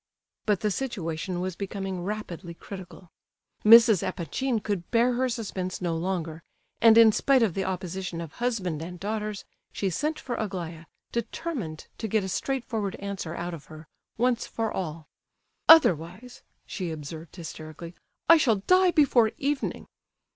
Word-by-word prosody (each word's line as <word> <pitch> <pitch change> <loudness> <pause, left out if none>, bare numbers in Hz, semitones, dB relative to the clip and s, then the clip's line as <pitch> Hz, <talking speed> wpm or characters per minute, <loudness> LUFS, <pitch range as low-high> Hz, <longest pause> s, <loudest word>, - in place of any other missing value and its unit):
But 205 -3 +2
the 210 - +1
situation 180 -7 -3
was 185 -1 -3
becoming 195 -2 -4
rapidly 180 -3 -5
critical. 185 -1 -10 0.5
Mrs. 225 -3 +8
Epanchin 225 - -2
could 200 -4 -3
bear 240 +1 +3
her 255 +1 +1
suspense 195 -6 -4
no 175 -2 -1
longer, 165 -2 -3 0.4
and 225 -1 +7
in 225 -1 +8
spite 265 +3 +3
of 205 -7 +1
the 195 +1 -2
opposition 185 -1 -4
of 165 -2 -7
husband 190 -11 -1
and 175 +2 -7
daughters, 210 +1 -3 0.3
she 195 -2 -2
sent 305 - -1
for 250 - -5
Aglaya, 170 -6 -5 0.3
determined 235 - -4
to 220 - -2
get 215 0 +1
a 190 - -4
straightforward 225 -3 -2
answer 195 -5 -5
out 175 +1 -4
of 150 -4 -9
her, 155 +1 -12 0.3
once 245 0 +1
for 225 -1 -2
all. 160 -4 -5 0.6
"Otherwise," 215 - +5 0.2
she 185 -4 -4
observed 160 +1 -8
hysterically, 165 -1 -8 0.3
"I 330 - +9
shall 250 -8 +3
die 365 - +4
before 265 -9 +4
evening." 285 0 -2
195 Hz, 145 wpm, -27 LUFS, 170-230 Hz, 0.6 s, I